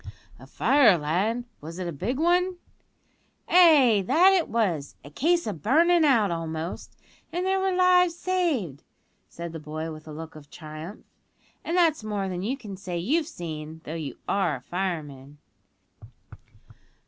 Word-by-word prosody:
"A 130 - -14
fire, 230 - +4
lad; 195 +11 -1 0.2
was 165 +3 -8
it 185 -1 -4
a - - -3
big 195 - -3
one?" 355 +3 +2 0.9
"Ay, 285 - +6
that 370 +4 +5
it 365 -4 +2
was; 180 -11 -1
a 145 - -12
case 340 - +1
o' 215 - -2
burnin' 325 - +3
out 230 - +3
almost; 165 0 -5 0.3
and 355 +2 -2
there 385 0 +1
were 385 0 +1
lives 360 -1 +4
saved," 310 - -1 0.5
said 170 -1 -7
the 160 - -6
boy 155 +1 -6
with 155 0 -11
a - - -8
look 160 +1 -9
of 145 -2 -13
triumph; 155 +5 -10 0.6
"and 340 - -2
that's 325 -8 +3
more 205 -2 -3
than 180 -1 -4
you 245 +8 -2
can 210 -7 -9
say 185 -2 -5
you've 290 - 0
seen, 160 - -7
though 155 - -7
you 155 -4 -6
are 185 -7 +1
a 125 - -9
fireman." 150 -5 -5
195 Hz, 160 wpm, -26 LUFS, -, 0.9 s, Ay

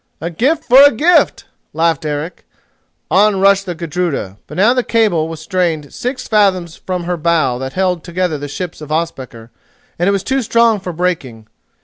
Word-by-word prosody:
"A 170 +3 -4
gift 265 - 0
for 255 +2 +6
a 285 0 +8
gift!" 320 +10 +2 0.3
laughed 160 -1 0
Eric. 150 +3 -5 0.7
On 200 +2 +3
rushed 195 0 +3
the 175 - -4
Gudruda, 165 - -3
but - - -9
now 215 +6 +4
the 250 -1 0
cable 210 -10 +1
was 165 -1 -7
strained 165 -4 -2
six 255 +1 -4
fathoms 185 -6 +1
from 180 -2 -4
her 175 0 -2
bow 155 -6 +1
that 130 0 -5
held 180 -3 -1
together 175 -3 -2
the 145 - -5
ships 170 +3 -6
of 150 0 -9
Ospakar 130 -8 -4 0.5
and 175 +3 +2
it - - +3
was 195 -1 -1
too 265 +4 0
strong 230 -1 +2
for 185 -1 -6
breaking. 160 -10 -3
175 Hz, 185 wpm, -16 LUFS, 155-200 Hz, 0.7 s, a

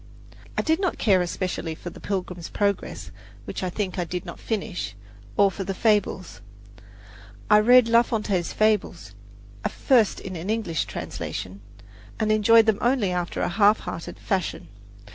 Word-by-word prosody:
I - - +1
did 320 +2 +2
not 375 -3 -1
care 190 -4 +3
especially 175 -2 -3
for 175 - -8
"The - - -12
Pilgrim's 180 -4 -4
Progress," 200 - -2 0.3
which - - -5
I 185 - -1
think 190 0 -3
I - - +1
did 180 +1 -5
not 170 - -8
finish, 190 - -4 0.4
or 200 -1 +5
for 195 - -5
the 195 0 -4
"Fables." 200 - 0 1.1
I 210 - +8
read 245 +2 +6
La 230 0 +6
Fontaine's 210 -7 -1
"Fables" 210 - 0 0.6
first 235 -6 +2
in 185 -1 -7
an 170 +4 -5
English 215 -8 -1
translation, 95 +2 -6 0.6
and 215 -1 +1
enjoyed 220 +1 +6
them 220 -2 +2
only 240 -6 +2
after 180 -1 -2
a - - +1
half 205 +3 +4
hearted 165 - -6
fashion. 190 -2 -3
200 Hz, 155 wpm, -25 LUFS, 180-220 Hz, 1.1 s, I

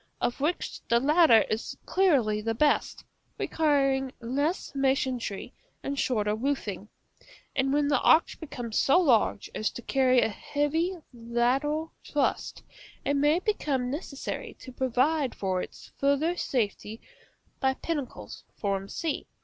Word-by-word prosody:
of 245 - -1
which 320 +5 -2
the 235 - +4
latter 295 -4 +5
is 220 - -4
clearly 260 - +2
the 225 +1 -2
best, 295 +5 +1 0.3
requiring 275 -4 +1
less 285 +9 -2
masonry 265 -6 -1 0.3
and 280 0 -3
shorter 210 -4 +1
roofing; 215 -5 -3 0.7
and 270 0 +1
when 290 0 +2
the 280 -2 +2
arch 320 - +4
becomes 245 -8 -4
so 280 +6 +5
large 240 - +2
as 215 - -1
to 240 - -9
cause 255 -1 +3
a - - +2
heavy 300 - -1 0.2
lateral 250 +7 0
thrust, 290 -2 -1 0.4
it 285 - +1
may 295 +3 +3
become 290 -11 -1
necessary 280 -2 -5
to 260 - -11
provide 260 +3 +1
for 185 -2 -1
its - - -10
farther 280 +5 +2
safety 220 - -2 0.6
by 265 -1 +1
pinnacles, 295 -5 -5 0.4
c. 320 +7 -3
270 Hz, 125 wpm, -28 LUFS, 235-295 Hz, 0.7 s, latter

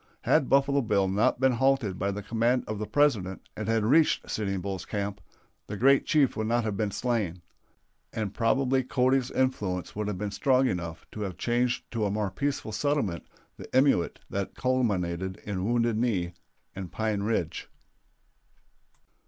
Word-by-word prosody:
Had 150 -4 +3
Buffalo 140 +1 +3
Bill 100 -5 +1
not 100 +5 +2
been 130 0 +4
halted 125 -6 +1
by 100 - 0
the 100 +1 -4
command 115 +4 +1
of 110 -2 -4
the 105 - -3
President 115 -11 +1
and 110 - -4
had 115 -1 +2
reached 150 +7 +3
Sitting 100 -3 -1
Bull's 95 0 -4
camp, 100 -1 -4 0.5
the 105 - -5
great 135 +5 +4
chief 145 -4 +3
would 110 -1 -2
not 120 +1 +1
have 105 -2 -2
been 105 +1 0
slain; 100 -6 -2 0.7
and 105 -3 -3
probably 130 +3 +2
Cody's 130 +1 +1
influence 100 -9 -1
would 105 0 -2
have 105 -3 -2
been 105 +1 -3
strong 130 +4 +3
enough 85 -5 -4
to 105 - -7
have 95 -4 -4
changed 120 +1 0
to 115 -3 -1
a - - +1
more 105 -1 -1
peaceful 140 -6 -2
settlement 110 - -1 0.3
the - - -10
emeute 130 -11 +3
that 100 -1 -3
culminated 95 -8 0
in 95 -2 -3
Wounded 115 -1 +1
Knee 95 -8 0 0.4
and 95 -3 -6
Pine 110 -2 -1
Ridge. 100 -6 -2
110 Hz, 165 wpm, -28 LUFS, 100-130 Hz, 0.7 s, been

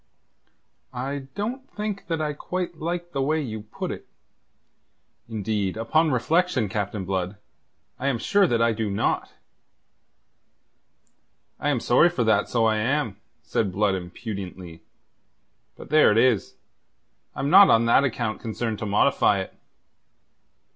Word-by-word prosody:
"I 135 +2 -4
don't 245 +7 -4
think 210 -1 -5
that 165 -2 -1
I 150 -1 -1
quite 175 +2 -5
like 175 +2 -3
the 135 - -2
way 155 +4 +1
you 110 -7 -4
put 105 +1 -6
it. - - -8 1.2
Indeed, 105 -2 -2
upon 155 +8 +2
reflection, 145 - +1
Captain 100 -1 -3
Blood, 95 +1 -2 0.6
I 135 - -2
am 135 -4 +1
sure 200 - +3
that 115 -5 +2
I 115 - +3
do 110 -1 -2
not." 100 - -1 2.3
"I 145 - 0
am 140 -4 +1
sorry 140 +9 +4
for 155 -8 -1
that, 110 -2 +2
so 115 -2 +2
I 110 -1 +2
am," 115 -2 -1 0.3
said 100 -4 -1
Blood 100 +1 +1
impudently. 90 -2 -7 1.0
"But - - -12
there 155 -6 +6
it 105 - +2
is. 120 -3 +2 0.8
I'm 140 - -2
not 195 +2 +9
on 115 +1 +4
that 115 +4 +5
account 115 -4 -2
concerned 110 -1 -3
to 110 - -4
modify 100 +1 +3
it." - - -5
115 Hz, 140 wpm, -24 LUFS, 105-155 Hz, 2.3 s, not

